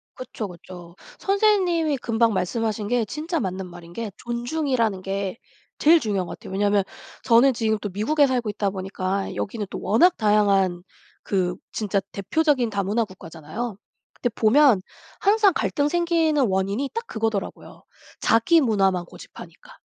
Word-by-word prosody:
그쵸, 235 Hz, -4 st, -6 dB
그쵸. 175 Hz, -1 st, -12 dB, 0.2 s
선생님이 375 Hz, -7 st, +2 dB
금방 230 Hz, -2 st, +1 dB
말씀하신 215 Hz, +2 st, -2 dB
게 240 Hz, -1 st, +1 dB
진짜 315 Hz, -, -3 dB
맞는 190 Hz, -3 st, -4 dB
말인 175 Hz, -1 st, -12 dB
게 220 Hz, 0 st, -5 dB
존중이라는 240 Hz, -4 st, -1 dB
게 195 Hz, +2 st, -3 dB, 0.4 s
제일 325 Hz, +2 st, +6 dB
중요한 200 Hz, -, -2 dB
것 -, -, -7 dB
같아요. -, -, -10 dB
왜냐하면 205 Hz, 0 st, +2 dB, 0.4 s
저는 245 Hz, +3 st, +5 dB
지금 220 Hz, -2 st, 0 dB
또 205 Hz, -, -3 dB
미국에 280 Hz, +10 st, +2 dB
살고 245 Hz, -4 st, -1 dB
있다 205 Hz, -1 st, -1 dB
보니까 190 Hz, 0 st, -3 dB
여기는 210 Hz, +1 st, -3 dB
또 -, -, -5 dB
워낙 345 Hz, -, +4 dB
다양한 200 Hz, -4 st, +2 dB, 0.4 s
그 180 Hz, -3 st, 0 dB, 0.2 s
진짜 205 Hz, -2 st, -1 dB
대표적인 255 Hz, -, +1 dB
다문화 205 Hz, +2 st, 0 dB
국가잖아요. 185 Hz, +4 st, -7 dB, 0.4 s
근데 245 Hz, -, -2 dB
보면 235 Hz, -1 st, +5 dB, 0.4 s
항상 410 Hz, -1 st, +4 dB
갈등 290 Hz, -2 st, 0 dB
생기는 330 Hz, -4 st, +2 dB
원인이 195 Hz, +8 st, -1 dB
딱 460 Hz, +1 st, -4 dB
그거더라고요. 220 Hz, -, -4 dB, 0.4 s
자기 230 Hz, +9 st, +4 dB
문화만 195 Hz, -7 st, +1 dB
고집하니까. -, -, -13 dB
220 Hz, 335 characters per minute, -23 LUFS, 195-280 Hz, 0.4 s, 제일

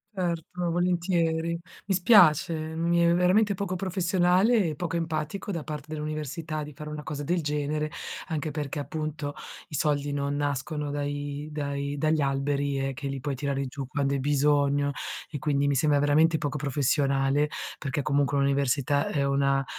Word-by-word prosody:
Certo, 175 Hz, -1 st, -2 dB
volentieri. 170 Hz, -1 st, +1 dB, 0.3 s
Mi 195 Hz, -, +2 dB
spiace, 175 Hz, -4 st, +6 dB
mi 160 Hz, +2 st, 0 dB
è 170 Hz, 0 st, +4 dB
veramente 200 Hz, +4 st, +3 dB
poco 185 Hz, -1 st, -3 dB
professionale 185 Hz, +3 st, +2 dB
e 155 Hz, -, -3 dB
poco 165 Hz, +1 st, -3 dB
empatico 165 Hz, +4 st, -2 dB
da 165 Hz, -4 st, -3 dB
parte 150 Hz, -1 st, -6 dB
dell'università 155 Hz, +1 st, -4 dB
di 150 Hz, 0 st, -6 dB
fare 150 Hz, +2 st, -8 dB
una 150 Hz, 0 st, -5 dB
cosa 145 Hz, -1 st, -5 dB
del 175 Hz, +3 st, 0 dB
genere, 150 Hz, 0 st, -1 dB, 0.4 s
anche 155 Hz, -2 st, -2 dB
perché, 145 Hz, -1 st, -4 dB
appunto, 150 Hz, 0 st, -4 dB, 0.4 s
i 150 Hz, -, -5 dB
soldi 145 Hz, 0 st, 0 dB
non 140 Hz, 0 st, -1 dB
nascono 145 Hz, +1 st, -2 dB
dai 145 Hz, 0 st, -3 dB
dai 140 Hz, -1 st, -3 dB
dagli 155 Hz, +1 st, +2 dB
alberi, 140 Hz, 0 st, 0 dB
ehm, 135 Hz, 0 st, -1 dB
che 140 Hz, +2 st, -5 dB
li 135 Hz, -1 st, -3 dB
puoi 145 Hz, +1 st, -2 dB
tirare 140 Hz, +1 st, -2 dB
giù 135 Hz, 0 st, -6 dB
quando 140 Hz, +1 st, 0 dB
hai 140 Hz, -, 0 dB
bisogno 145 Hz, 0 st, +2 dB, 0.4 s
e 145 Hz, -, -4 dB
quindi 140 Hz, 0 st, +1 dB
mi 140 Hz, -, +2 dB
sembra 145 Hz, +1 st, +3 dB
veramente 155 Hz, +3 st, +4 dB
poco 145 Hz, -1 st, -2 dB
professionale 140 Hz, 0 st, +1 dB, 0.3 s
perché 140 Hz, 0 st, -2 dB
comunque 140 Hz, +1 st, +1 dB
un'università 140 Hz, 0 st, +2 dB
è 140 Hz, -2 st, 0 dB
una 140 Hz, 0 st, +2 dB
150 Hz, 160 wpm, -27 LUFS, 140-165 Hz, 0.4 s, spiace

